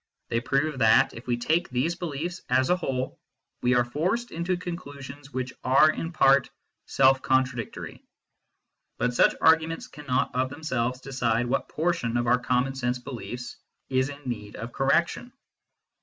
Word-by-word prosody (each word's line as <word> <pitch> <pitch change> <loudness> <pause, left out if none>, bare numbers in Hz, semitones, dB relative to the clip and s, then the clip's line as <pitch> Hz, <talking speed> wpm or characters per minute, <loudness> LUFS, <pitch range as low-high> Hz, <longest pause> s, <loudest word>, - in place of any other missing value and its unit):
They 115 - +1
prove 140 +2 0
that, 110 -2 +5
if 115 - -11
we 120 -1 +1
take 160 +8 0
these 130 +7 0
beliefs 175 +1 -4
as 130 +4 +3
a - - +5
whole, 130 -7 -3 0.4
we 125 0 +3
are 120 -1 +3
forced 185 - -1
into 170 +2 -1
conclusions 145 -6 -8
which 130 -1 -3
are 135 +4 +5
in 165 +1 -4
part 135 -4 +4 0.4
self 135 0 +4
contradictory; 130 -3 -1 0.9
but 125 0 0
such - - +4
arguments 160 0 +3
cannot 135 -4 -2
of 130 +1 0
them 145 +4 -10
selves 125 -3 -1
decide 125 -3 0
what 120 - -1
portion 155 -8 0
of 120 - 0
our 120 +1 +3
common 125 +2 0
sense 125 -1 -1
beliefs 125 -1 -7 0.3
is 130 +1 +1
in 145 0 -9
need 105 -4 -5
of 115 +2 -7
correction. 170 - +1
130 Hz, 155 wpm, -26 LUFS, 125-155 Hz, 0.9 s, that